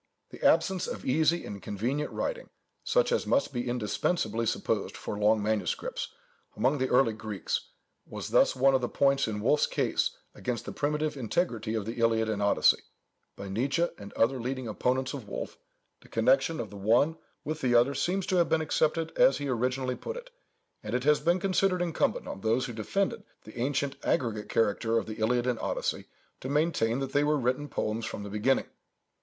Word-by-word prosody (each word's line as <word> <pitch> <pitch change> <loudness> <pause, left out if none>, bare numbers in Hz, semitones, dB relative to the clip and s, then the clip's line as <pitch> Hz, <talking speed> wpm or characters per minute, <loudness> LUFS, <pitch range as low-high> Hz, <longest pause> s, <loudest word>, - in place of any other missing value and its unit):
The - - -11
absence 190 -2 +3
of - - -6
easy 160 +5 +2
and 100 -1 -7
convenient 125 +9 -2
writing, - - -3 0.3
such - - +2
as 480 - 0
must 280 - +1
be 120 0 -2
indispensably 115 - -1
supposed - - -1
for - - -5
long 105 +1 +3
manuscripts, 105 -4 -1 0.5
among 130 +6 +2
the 130 - 0
early 125 -3 +4
Greeks, 105 -2 -3 0.4
was - - -6
thus - - +4
one 135 +1 +4
of 130 - +3
the 120 - -1
points 140 -1 +2
in 105 -1 -3
Wolf's 145 +7 +3
case - - 0 0.2
against 125 -2 -4
the - - -5
primitive 150 +1 -1
integrity 115 - -1
of 110 -3 -2
the 115 +2 -5
Iliad 115 -1 +2
and 105 -2 -1
Odyssey. 100 - +4 0.6
By 100 - -7
Nitzsch, 135 - 0
and 100 0 -9
other 125 +2 +1
leading 130 0 -3
opponents 125 +4 0
of 130 -7 -7
Wolf, - - -6 0.4
the - - -17
connection 135 +7 +2
of 110 - -5
the 100 - -9
one 120 +10 +3 0.3
with 155 +1 -4
the 125 -2 +2
other 120 +4 +5
seems 185 +5 0
to 185 - +1
have 170 - +3
been 160 - +3
accepted 160 +1 0
as 255 +2 +5
he 145 - -4
originally 125 +1 0
put 470 - -6
it; - - -10 0.5
and 105 +3 -4
it 125 - 0
has 150 +1 +4
been 170 +4 +2
considered 185 0 +1
incumbent 175 -2 0
on 95 - -6
those 115 +3 +1
who 120 - -6
defended 185 - -1 0.2
the 110 +2 -10
ancient 140 +2 0
aggregate 110 -4 -1
character 115 +1 +1
of 115 - 0
the 110 0 -7
Iliad 120 +2 +1
and 125 -2 0
Odyssey, - - -2 0.3
to 130 - -6
maintain 145 -6 +1
that 135 - -4
they 145 - +3
were 150 +1 +2
written 130 +3 0
poems 110 -1 -2
from 105 - -5
the 100 - -7
beginning. 105 +6 +2
125 Hz, 190 wpm, -29 LUFS, 110-150 Hz, 0.6 s, other